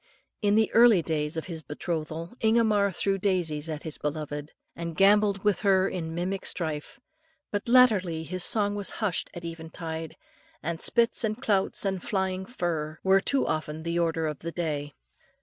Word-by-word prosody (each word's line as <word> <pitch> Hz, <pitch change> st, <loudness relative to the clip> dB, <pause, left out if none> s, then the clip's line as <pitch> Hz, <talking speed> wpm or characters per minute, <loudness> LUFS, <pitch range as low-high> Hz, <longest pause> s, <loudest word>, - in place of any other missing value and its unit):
In 205 Hz, -1 st, +3 dB
the 220 Hz, 0 st, +3 dB
early 230 Hz, -6 st, +6 dB
days 155 Hz, 0 st, -1 dB
of 160 Hz, -, -3 dB
his 165 Hz, -3 st, -6 dB
betrothal, 160 Hz, +2 st, -4 dB
Ingomar 220 Hz, -3 st, +3 dB
threw 195 Hz, +1 st, -1 dB
daisies 170 Hz, -6 st, 0 dB
at 155 Hz, -1 st, -5 dB
his 160 Hz, -2 st, -5 dB
beloved, 150 Hz, 0 st, -4 dB, 0.2 s
and 170 Hz, -1 st, -5 dB
gambolled 200 Hz, 0 st, +4 dB
with 210 Hz, -3 st, +2 dB
her 195 Hz, -2 st, +3 dB
in 165 Hz, -4 st, -4 dB
mimic 185 Hz, +3 st, -2 dB
strife, 155 Hz, -, -3 dB, 0.5 s
but 205 Hz, +2 st, -3 dB
latterly 205 Hz, -10 st, +4 dB
his 185 Hz, +2 st, -2 dB
song 205 Hz, -2 st, +3 dB
was 205 Hz, -1 st, -2 dB
hushed 205 Hz, -5 st, -1 dB
at 170 Hz, 0 st, -7 dB
eventide, 160 Hz, -1 st, -6 dB, 0.5 s
and 165 Hz, +1 st, -3 dB
spits 235 Hz, 0 st, +2 dB
and 215 Hz, 0 st, -1 dB
clouts 200 Hz, -6 st, +1 dB
and 190 Hz, -2 st, -1 dB
flying 190 Hz, -1 st, -2 dB
fluff 160 Hz, -9 st, -3 dB
were 190 Hz, 0 st, +5 dB
too 275 Hz, +6 st, +1 dB
often 155 Hz, 0 st, -3 dB
the 170 Hz, +1 st, -1 dB
order 165 Hz, -1 st, 0 dB
of 150 Hz, -2 st, -3 dB
the 170 Hz, -, -5 dB
day. 150 Hz, -4 st, -3 dB
175 Hz, 165 wpm, -27 LUFS, 160-200 Hz, 0.5 s, early